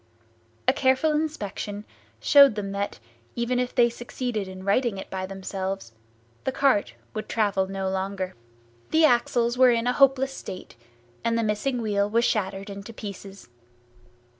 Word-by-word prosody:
A -, -, +6 dB
careful 265 Hz, +4 st, +2 dB
inspection 215 Hz, -9 st, -3 dB, 0.3 s
showed 280 Hz, -6 st, +7 dB
them 200 Hz, -2 st, -3 dB
that, 200 Hz, 0 st, -3 dB, 0.4 s
even 240 Hz, +1 st, 0 dB
if 250 Hz, 0 st, -2 dB
they 240 Hz, -1 st, +6 dB
succeeded 240 Hz, -3 st, -4 dB
in 185 Hz, 0 st, -9 dB
righting 215 Hz, +1 st, +1 dB
it 190 Hz, -, -8 dB
by 185 Hz, 0 st, -3 dB
themselves, 190 Hz, -, -5 dB, 0.5 s
the 265 Hz, -, 0 dB
cart 230 Hz, -, +2 dB, 0.2 s
would 215 Hz, -, -5 dB
travel 200 Hz, -4 st, +1 dB
no 195 Hz, 0 st, -3 dB
longer. 190 Hz, 0 st, -2 dB, 0.6 s
The 320 Hz, 0 st, +5 dB
axles 240 Hz, -2 st, +2 dB
were 255 Hz, -1 st, +8 dB
in 230 Hz, -1 st, +2 dB
a 250 Hz, -, +2 dB
hopeless 270 Hz, 0 st, +4 dB
state, 185 Hz, -, -8 dB, 0.5 s
and 230 Hz, 0 st, +1 dB
the 230 Hz, -, +1 dB
missing 230 Hz, +4 st, -1 dB
wheel 205 Hz, -1 st, +1 dB
was 230 Hz, +2 st, +2 dB
shattered 195 Hz, -1 st, -1 dB
into 200 Hz, +3 st, -8 dB
pieces. 200 Hz, -1 st, -9 dB
215 Hz, 150 wpm, -25 LUFS, 195-250 Hz, 0.6 s, were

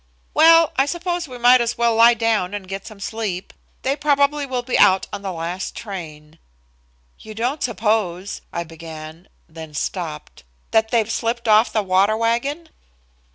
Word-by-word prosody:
"Well, 330 Hz, 0 st, +6 dB
I 270 Hz, +1 st, +3 dB
suppose 345 Hz, 0 st, -3 dB
we 250 Hz, -2 st, -9 dB
might 245 Hz, +1 st, +6 dB
as 235 Hz, -1 st, -2 dB
well 235 Hz, 0 st, +2 dB
lie 230 Hz, +1 st, +6 dB
down 215 Hz, -4 st, 0 dB
and 195 Hz, -2 st, -7 dB
get 195 Hz, +1 st, -6 dB
some 215 Hz, -3 st, -11 dB
sleep. 200 Hz, -3 st, -4 dB, 0.3 s
They 270 Hz, +1 st, +1 dB
probably 285 Hz, 0 st, +1 dB
will 250 Hz, -2 st, -3 dB
be 250 Hz, -, -2 dB
out 190 Hz, 0 st, +5 dB
on -, -, -5 dB
the 195 Hz, -1 st, -4 dB
last 175 Hz, +2 st, -5 dB
train." 160 Hz, -7 st, -9 dB, 0.8 s
"You 215 Hz, 0 st, -11 dB
don't 250 Hz, +7 st, -2 dB
suppose," 210 Hz, -5 st, -1 dB
I 170 Hz, -, -3 dB
began, 160 Hz, +1 st, -11 dB, 0.2 s
then 160 Hz, -1 st, -11 dB
stopped. 75 Hz, -, -5 dB, 0.3 s
"That 220 Hz, 0 st, +2 dB
they've 225 Hz, -2 st, +1 dB
slipped 235 Hz, +1 st, -2 dB
off 215 Hz, +2 st, +5 dB
the 215 Hz, -, 0 dB
water 195 Hz, +3 st, +2 dB
wagon?" 270 Hz, +8 st, -1 dB
220 Hz, 160 wpm, -21 LUFS, 185-245 Hz, 0.8 s, Well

